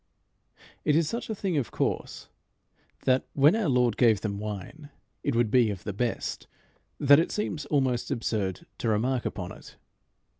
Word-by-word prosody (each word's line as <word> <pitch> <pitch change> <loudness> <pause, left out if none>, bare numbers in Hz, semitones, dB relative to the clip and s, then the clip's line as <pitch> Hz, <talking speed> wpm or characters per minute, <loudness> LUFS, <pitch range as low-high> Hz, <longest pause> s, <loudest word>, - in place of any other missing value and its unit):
'" - - -46 0.3
It 150 - +3
is 165 -1 +3
such 230 +8 -4
a 220 - -2
thing 190 -5 -1
of 135 - -1
course - - -3 0.8
that, 130 0 +2
when 145 +7 +5
our 220 -8 0
Lord 125 -4 +2
gave 115 -5 +4
them 100 -2 -3
wine, 105 - -7 0.3
it 140 - -1
would 115 -2 +2
be 120 -4 +4
of 100 -3 -5
the 105 - -4
best, 120 +4 -3 0.5
that 145 +1 +7
it 165 - 0
seems 165 -7 -3
almost 130 -4 +1
absurd 110 -8 -2
to 115 - 0
remark 120 +4 0
upon - - -5
it. - - -13
125 Hz, 175 wpm, -27 LUFS, 110-150 Hz, 0.8 s, that